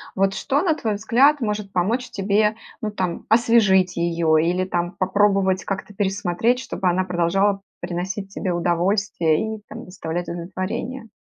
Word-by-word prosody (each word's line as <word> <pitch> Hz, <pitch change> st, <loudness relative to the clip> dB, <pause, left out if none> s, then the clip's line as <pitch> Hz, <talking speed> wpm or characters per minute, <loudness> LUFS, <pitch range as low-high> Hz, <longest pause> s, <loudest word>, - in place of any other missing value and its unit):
Вот 195 Hz, 0 st, +2 dB
что, 285 Hz, +1 st, 0 dB
на 335 Hz, -4 st, +2 dB
твой 220 Hz, -7 st, -2 dB
взгляд, 260 Hz, +8 st, +3 dB
может 210 Hz, -3 st, -2 dB
помочь 225 Hz, +8 st, 0 dB
тебе, 210 Hz, +2 st, +1 dB, 0.3 s
ну, 215 Hz, -, -2 dB
там 185 Hz, -4 st, -3 dB
освежить 210 Hz, -6 st, +4 dB
ее 170 Hz, -1 st, +1 dB
или 180 Hz, +2 st, +1 dB
там 175 Hz, -1 st, -2 dB
попробовать 195 Hz, 0 st, +2 dB
как-то 195 Hz, +1 st, -4 dB
пересмотреть, 200 Hz, +4 st, 0 dB
чтобы 215 Hz, -6 st, -3 dB
она 180 Hz, +2 st, +1 dB
продолжала 190 Hz, +3 st, +1 dB, 0.2 s
приносить 185 Hz, +3 st, -4 dB
тебе 185 Hz, -, -2 dB
удовольствие 175 Hz, +2 st, +1 dB
и -, -, -17 dB
там -, -, -9 dB
доставлять 175 Hz, -1 st, -5 dB
удовлетворение? 185 Hz, +8 st, -5 dB
195 Hz, 145 wpm, -22 LUFS, 175-215 Hz, 0.3 s, освежить